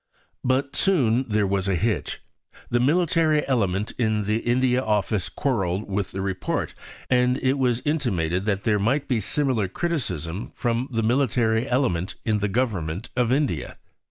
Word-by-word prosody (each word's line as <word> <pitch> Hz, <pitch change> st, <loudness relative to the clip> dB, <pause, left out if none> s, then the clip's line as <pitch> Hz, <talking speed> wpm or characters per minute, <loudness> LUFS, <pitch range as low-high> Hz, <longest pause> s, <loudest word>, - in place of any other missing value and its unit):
But 135 Hz, +2 st, 0 dB
soon 130 Hz, -, +2 dB
there 105 Hz, -1 st, +2 dB
was 95 Hz, 0 st, 0 dB
a 95 Hz, -, +2 dB
hitch. 110 Hz, +5 st, -1 dB, 0.5 s
The 120 Hz, -, +3 dB
military 155 Hz, +2 st, +2 dB
element 105 Hz, -6 st, 0 dB
in 110 Hz, -3 st, +1 dB
the 105 Hz, +2 st, +1 dB
India 125 Hz, +2 st, +2 dB
Office 105 Hz, -4 st, 0 dB
quarrelled 100 Hz, -8 st, -1 dB
with 100 Hz, -1 st, -2 dB
the 95 Hz, -, -4 dB
Report, 95 Hz, -1 st, -2 dB, 0.3 s
and 125 Hz, 0 st, +3 dB
it 135 Hz, +1 st, 0 dB
was 125 Hz, -2 st, +1 dB
intimated 95 Hz, -, 0 dB
that 100 Hz, -2 st, 0 dB
there 105 Hz, -2 st, +2 dB
might 130 Hz, +8 st, +1 dB
be 125 Hz, -5 st, +1 dB
similar 125 Hz, -1 st, 0 dB
criticism 95 Hz, -, -3 dB
from 120 Hz, +2 st, -1 dB
the 115 Hz, -2 st, 0 dB
military 120 Hz, 0 st, +1 dB
element 110 Hz, -9 st, 0 dB
in 110 Hz, -2 st, +1 dB
the 100 Hz, 0 st, 0 dB
Government 95 Hz, -6 st, -2 dB
of 125 Hz, -1 st, +1 dB
India. 145 Hz, +2 st, -1 dB
115 Hz, 155 wpm, -24 LUFS, 100-130 Hz, 0.5 s, The